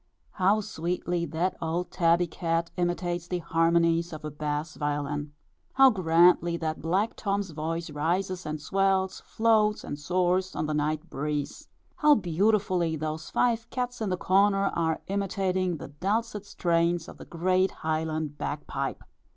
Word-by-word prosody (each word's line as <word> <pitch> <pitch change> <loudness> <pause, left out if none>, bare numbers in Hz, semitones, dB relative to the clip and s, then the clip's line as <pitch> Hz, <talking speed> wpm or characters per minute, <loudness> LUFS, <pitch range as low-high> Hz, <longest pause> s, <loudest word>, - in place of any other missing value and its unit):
How 200 +3 +2
sweetly 175 -2 -2
that 165 +5 -1
old 170 +2 -2
tabby 170 -1 +3
cat 165 0 -2
imitates 175 -1 -1
the 180 - -1
harmonies 170 0 +2
of 155 -1 -7
a 150 - -4
bass 150 +1 -3
violin! 145 0 -2 0.4
How 270 -1 +7
grandly 170 -2 +4
that 160 -1 -3
black 190 +7 0
Tom's 200 -2 -2
voice 160 +1 -4
rises 180 +5 -1
and 155 0 -4
swells, 190 +3 +1
floats 220 -1 +2
and 145 - -6
soars, 180 +3 0
on - - -1
the 155 - -2
night 155 +2 -1
breeze! 145 +1 -3 0.3
How 300 -4 +6
beautifully 185 - +1
those 155 +1 -4
five 235 -2 +1
cats 245 -2 -3
in 215 - -1
the 185 - 0
corner, 195 +2 +3
are 160 -1 0
imitating 190 -2 -1
the 140 - -8
dulcet 205 +7 -2
strains 170 -2 +1
of - - -11
the - - -9
great 185 +2 +1
highland 155 -1 -3
bag 145 0 -4
pipe! - - -4
175 Hz, 150 wpm, -27 LUFS, 160-190 Hz, 0.4 s, How